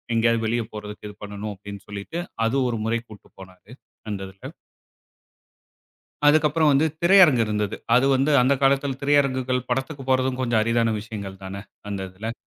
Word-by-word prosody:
எங்கயாவது 115 0 +2
வெளிய 115 +1 0
போறதுக்கு 105 0 -8
இது 105 - -12
பண்ணணும். 105 +1 -6
அப்டின்னு 100 +1 -10
சொல்லிட்டு, 105 +11 -5 0.3
அது 115 - -1
ஒரு 115 -2 -2
முறை 115 +1 0
கூட்டு 105 -2 -14
போனாரு. 95 +2 -14 0.4
அந்த 100 -2 -4
இதுல. 95 - -11 1.7
அதுக்கப்புறம் 155 +1 +4
வந்து 140 +3 +3 0.2
திரையரங்கு 170 -9 +6
இருந்தது. 105 -1 -2 0.2
அது 125 +2 +4
வந்து 135 +3 +2
அந்த 130 +3 +3
காலத்தில 135 0 +2
திரையரங்குகள் 130 -3 +1
படத்துக்கு 135 +2 -3
போறதும் 130 0 +1
கொஞ்சம் 120 -3 +2
அரிதான 115 0 +1
விஷயங்கள் 100 -3 -8
தான, 95 - -7 0.4
அந்த 100 -1 -3
இதில. 110 +5 -5
115 Hz, 150 wpm, -23 LUFS, 105-135 Hz, 1.7 s, திரையரங்கு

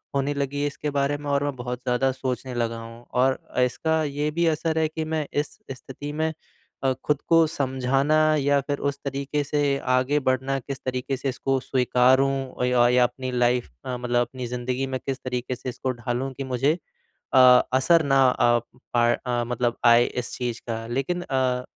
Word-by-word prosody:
होने 140 +1 +1
लगी 140 0 -2
है 145 - +1
इसके 145 +1 -4
बारे 140 0 0
में 145 0 -6
और 140 0 +2
मैं 145 -1 -2
बहुत 125 0 -5
ज़्यादा 125 +2 +1
सोचने 130 0 -4
लगा 115 -1 -1
हूँ 115 +1 -11 0.2
और 130 0 +3 0.3
इसका 160 +6 0
ये 145 0 -1
भी 170 +2 0
असर 160 +1 -2
है 160 - +2
कि 160 0 -4
मैं 155 -2 0
इस 145 +1 -2
स्थिति 135 +2 -8
में 155 +1 0 0.6
अ, 135 -1 +3
खुद 150 -1 0
को 165 -1 +5
समझाना 135 0 +1
या 140 -1 +2
फिर 145 +1 -3
उस 140 0 -7
तरीक़े 140 +2 -2
से 145 -1 +1 0.2
आगे 135 +3 +1
बढ़ना 135 +1 -1
किस 135 +1 -7
तरीक़े 130 +1 -2
से 135 +1 -2
इसको 135 +1 -1
स्वीकारूँ 130 +1 +2
य 125 - +1 0.2
या 125 0 +5
अपनी 130 +1 -2
लाइफ़ 125 - +1 0.2
मे 125 -1 -2
मतलब 120 0 0
अपनी 125 +1 -4
ज़िंदगी 125 +2 -2
में 130 -1 -3
किस 135 -1 -2
तरीक़े 125 0 -3
से 130 - -6
इसको 130 +1 -3
ढालूँ 120 +2 -3
कि 135 - -5
मुझे 130 +3 +1 0.6
अ, - - +5 0.4
असर 160 +6 +4
ना 135 -2 +4 0.6
प 120 0 +3
अ, 120 -1 0
मतलब 120 0 -1
आए 120 0 +7
इस 125 -1 -4
चीज़ 120 -2 -3
का 115 -1 -3
लेकिन 135 +9 -2
अ, 130 -5 0
130 Hz, 185 wpm, -24 LUFS, 125-145 Hz, 0.6 s, आए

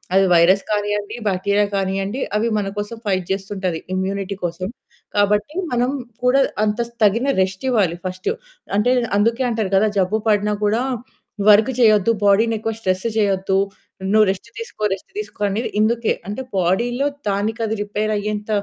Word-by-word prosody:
అది 195 0 +5
వైరస్ 185 +4 +5
కానియ్యండి, 205 0 -1
బాక్టీరియా 200 +2 +1
కానీయండి 195 +5 -1 0.2
అవి 230 +2 +1
మన 200 -1 -1
కోసం 210 +3 -5
ఫైట్ 185 -2 0
చేస్తుంటది 190 -3 -2 0.2
ఇమ్యూనిటీ 195 +1 -2
కోసం. 175 +2 -3 0.5
కాబట్టి 210 - +2 0.2
మనం 245 +1 +2 0.4
కూడా 265 +2 +5 0.2
అంత 210 +1 -1 0.2
తగిన 230 +6 +3
రెస్టివ్వాలి 195 -2 +1
ఫస్టు. 185 0 -2 0.4
అంటే 245 +4 +3 0.3
అందుకే 230 +4 +2
అంటారు 220 -4 -1
కదా 215 +2 +4
జబ్బు 200 +4 +1
పడినా 210 0 +2
కూడా 220 +4 +1 0.7
వర్క్ 215 +4 +6
చేయొద్దు, 215 -2 +5
బాడీ‌ని 220 +3 +4
ఎక్కువ 225 +1 -3
స్ట్రెస్ 185 -1 -1
చేయొద్దు, 195 -2 +1 0.5
నువ్వు 215 0 +6
రెస్ట్ 195 +4 -3
తీసుకో, 460 - -7
రెస్ట్ 195 - -8
తీసుకో 420 - -6
అనేది 210 +4 -2
ఇందుకే. 225 +1 +2
అంటే 210 +6 -4 0.2
బాడీలో 235 +9 +1 0.2
దానికది 220 +2 -1
రిపేర్ 210 +1 -2
అయ్యేంత 210 +1 -3
205 Hz, 140 wpm, -20 LUFS, 195-225 Hz, 0.7 s, వర్క్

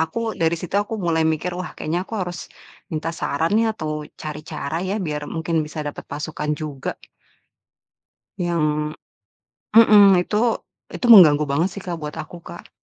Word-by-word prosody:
aku 220 +8 -1
dari 165 0 +2
situ, 170 +1 -8
aku 215 +2 -4
mulai 170 -4 0
mikir 160 +3 -1
wah 185 - -5
kayaknya 165 +3 -2
aku - - -6
harus 175 -1 -6 0.4
minta 160 -1 -3
saran 165 +2 -1
nih 225 +1 +3
atau 155 -3 -4
cari 150 -1 -6
cara 150 0 -4
ya 190 +2 -2
biar 150 -1 -4
mungkin 165 0 -1
bisa 155 - -9
dapat 145 - -6
pasukan 150 +1 -4
juga. 145 -3 -5 1.4
Yang 150 -3 0 0.8
mhm, 215 -2 +8 0.2
itu, 210 - -3 0.6
itu - - -2
mengganggu 155 -8 +8
banget 160 +6 +2
sih 200 - -7
Kak, 175 -2 -3
buat 150 -1 -6
aku, 170 +3 -11
Kak. - - -11
160 Hz, 160 wpm, -22 LUFS, 150-180 Hz, 1.4 s, mhm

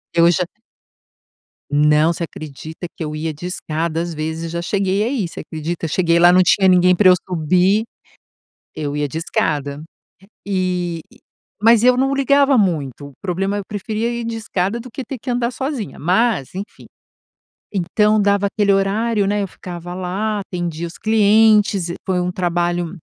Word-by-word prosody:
Eu 170 0 +6
já 180 +1 0 1.3
Não. 150 +3 +4
Você 170 - -4
acredita 155 +2 -8
que 165 - -4
eu 150 0 -5
ia 155 +1 -3
de 155 +4 -8
escada? 165 -2 -3
Às 170 -1 -5
vezes 160 +2 -4
já 170 +1 -3
cheguei 195 +1 0
a 225 - 0
ir, 230 -10 -1
você - - -9
acredita? 165 +2 -4
Cheguei 170 +1 +2
lá, 175 +1 +7
não 185 +1 +6
tinha 190 +2 +4
ninguém 180 0 +5
pra 190 -1 +5
eu 180 - +8
subir, 185 +5 +2 0.9
eu 145 -1 -4
ia 145 -1 -1
de 160 - -5
escada. 145 -3 -2 0.6
E 180 -3 -1 0.6
mas 230 0 +6
eu 250 0 +5
não 270 +1 +1
ligava 275 -1 +3
muito. 145 - -1
O - - -18
problema 195 +2 -1
é - - -1
eu - - -6
preferia 215 +3 -3
ir 235 -1 -4
de 230 0 -3
escada 215 0 -2
do 250 +1 -10
que 265 - -6
ter 270 - -6
que 250 - -4
andar 240 0 0
sozinha. 245 - -4
Mas, 185 - +1
enfim. 200 +2 -8 0.9
Então 210 +4 +2
dava 200 0 +2
aquele 200 0 +1
horário, 200 +2 +1
né, 205 +1 0
eu 195 - -3
ficava 175 -1 -8
lá, 190 +4 -2
atendia 170 -3 -4
os 170 - -10
clientes. 210 -3 +4
E - - -4
foi 185 -1 0
um 180 0 -1
trabalho 175 -1 -1
185 Hz, 175 wpm, -19 LUFS, 170-210 Hz, 1.3 s, eu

